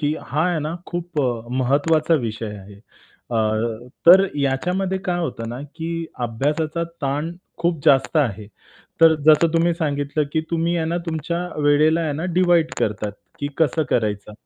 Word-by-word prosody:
की 150 0 0
हा 150 +6 0
आहे 170 -3 0
ना 155 +3 -3
खूप 175 -3 -3
अ, 120 -2 -2
महत्त्वाचा 150 +5 +2
विषय 110 -2 -4
आहे. 100 +1 -12 0.6
अ, 115 - -1 0.7
तर 190 +3 +9 0.2
याच्यामध्ये 180 +8 0
काय 175 -1 0
होतं 115 -8 -4
ना, 120 +3 -6
की 165 0 -4 0.2
अभ्यासाचा 150 +8 -1 0.2
ताण 145 +5 -1 0.3
खूप 170 -3 0
जास्त 135 +4 +4
आहे. 110 -8 0 0.5
तर 165 -1 +7
जसं 155 +2 +6
तुम्ही 170 +1 +3
सांगितलं, 145 -2 -1
की 160 - +1
तुम्ही 170 +1 0
आहे 160 -1 -1
ना, 170 - -1
तुमच्या 170 +2 -2 0.2
वेळेला 150 +3 +4
आहे 155 -3 -1
ना 155 +4 -4
डिव्हाइड 175 -3 +3
करतात, 105 -1 -1 0.3
की 145 - -2
कसं 160 0 +2
करायचं. 105 -2 -1
155 Hz, 160 wpm, -21 LUFS, 135-170 Hz, 0.7 s, तर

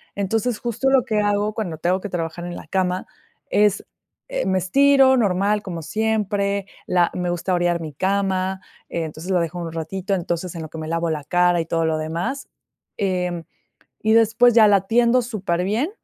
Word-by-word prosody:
Entonces, 220 +4 -1
justo 240 +3 -1
lo 265 -2 +4
que 215 -2 0
hago 205 +1 0
cuando 185 -8 -4
tengo 180 +4 0
que 205 - -5
trabajar 170 0 -4
en 175 - -6
la - - -11
cama 185 +1 -1 0.4
es, 205 0 +2 0.4
eh, - - -2
me 190 0 +1
estiro 270 +7 +5
normal, 205 -1 +1
como 170 -5 -6
siempre, 205 0 -1 0.2
la 175 -2 +2
me 180 -1 -2
gusta 175 +2 -1
orear 175 -1 +1
mi 155 -3 -6
cama, 190 +1 -1 0.3
entonces, 165 +2 -4
la 180 - +3
dejo 170 +1 -3
en 170 - -4
un 165 - -7
ratito, 185 +4 -3
entonces, 175 -1 -2
en 165 - -5
lo 155 - -8
que 160 - -9
me 155 0 -5
lavo 165 0 -1
la 150 -2 -2
cara 175 +3 +2
y - - -4
todo 165 0 0
lo 160 -1 +1
demás, 170 - -3 0.5
em, 180 -3 -1 0.6
y 220 0 +2
después, 230 +2 +5
ya 220 -2 +7
la 200 -2 +4
tiendo 240 +2 +4
superbién, 210 - -1
190 Hz, 185 wpm, -22 LUFS, 170-215 Hz, 0.6 s, ya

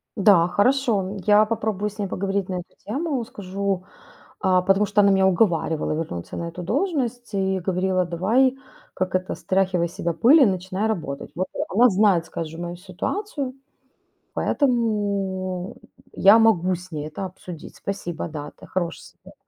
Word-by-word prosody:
Да, 195 -5 +5
хорошо, 235 +3 +2
м. 190 +2 -5
Я 210 +1 +6
попробую 210 -2 -2
с 210 +1 -17
ней 200 - -1
поговорить 195 0 -2
на 185 - -2
эту 175 - -9
тему. 275 +3 -2
Скажу, 200 -4 -3 0.6
а 185 -1 +3
потому 195 +3 +3
что 205 0 +3
она 200 0 +5
меня 190 0 +4
уговаривала 175 -4 +1
вернуться 150 - -5
на 170 - -3
эту 170 +2 -8
должность 245 - -1
и 190 -1 0
говорила: 185 0 0
"Давай, 225 +10 +2 0.4
как 185 -1 -2
это, 185 0 -1
стряхивай 185 -2 +1
с - - -15
себя 170 - -1
пыль 280 - +6
и - - +8
начинай 190 +1 -1
работать". 150 -11 -4
Вот, 185 +3 -1
э, - - -7
она 235 +6 +5
знает, 195 -4 +3
скажем, 165 0 -6
мою 175 0 -5
ситуацию, 260 - -4 0.8
поэтому, 200 - -1
м, - - -19 0.2
я 200 +3 +6
могу 185 -5 +3
с 180 +2 -13
ней 150 -1 -4
это 195 - -6
обсудить. 180 -2 -10
Спасибо, 175 -5 -4
да, 150 -2 -6
это - - -14
хороший 175 -2 -3 0.2
совет. - - -14
190 Hz, 165 wpm, -23 LUFS, 180-215 Hz, 0.8 s, и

